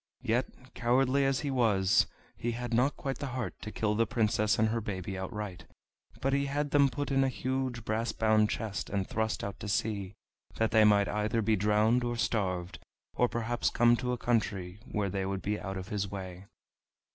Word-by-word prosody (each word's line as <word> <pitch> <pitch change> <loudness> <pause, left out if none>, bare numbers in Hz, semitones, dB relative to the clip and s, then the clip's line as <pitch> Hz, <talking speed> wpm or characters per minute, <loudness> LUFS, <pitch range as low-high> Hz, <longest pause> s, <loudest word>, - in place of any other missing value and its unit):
Yet, 125 +2 -2
cowardly 130 +3 +2
as 135 -1 +1
he 145 - -2
was, 105 -7 +3 0.3
he 120 0 -2
had 120 0 -4
not 125 +5 +2
quite 135 -1 -4
the 140 - -3
heart 125 - -4
to 110 - -6
kill 105 -1 0
the 115 +1 +2
Princess 110 -1 +1
and 110 0 +3
her 115 +1 -1
baby 95 -2 -4
outright, 95 0 -5 0.6
but 135 +1 +1
he 140 0 +1
had 145 +1 -1
them 140 -1 +5
put 145 +2 -3
in 135 0 +3
a - - +2
huge 130 -3 -2
brass 110 +2 -1
bound 110 -1 +3
chest 100 -4 -3
and 100 -1 -1
thrust 110 0 -1
out 100 0 -5
to - - -6
sea, 100 -1 -1 0.4
that 110 -1 +1
they 110 -1 +6
might 100 -1 +5
either 105 +2 0
be 110 +1 +3
drowned 105 +4 +3
or 120 0 -1
starved, 90 -6 -1 0.3
or 125 - +3
perhaps 120 +1 0
come 120 0 +4
to 125 0 -2
a 125 - -1
country 100 -6 -1
where 100 -2 -1
they 95 0 -1
would 95 0 -3
be 105 +1 -1
out 95 -1 -5
of 95 +2 -6
his 100 -2 -2
way. 95 -1 -7
110 Hz, 200 wpm, -30 LUFS, 100-125 Hz, 0.6 s, they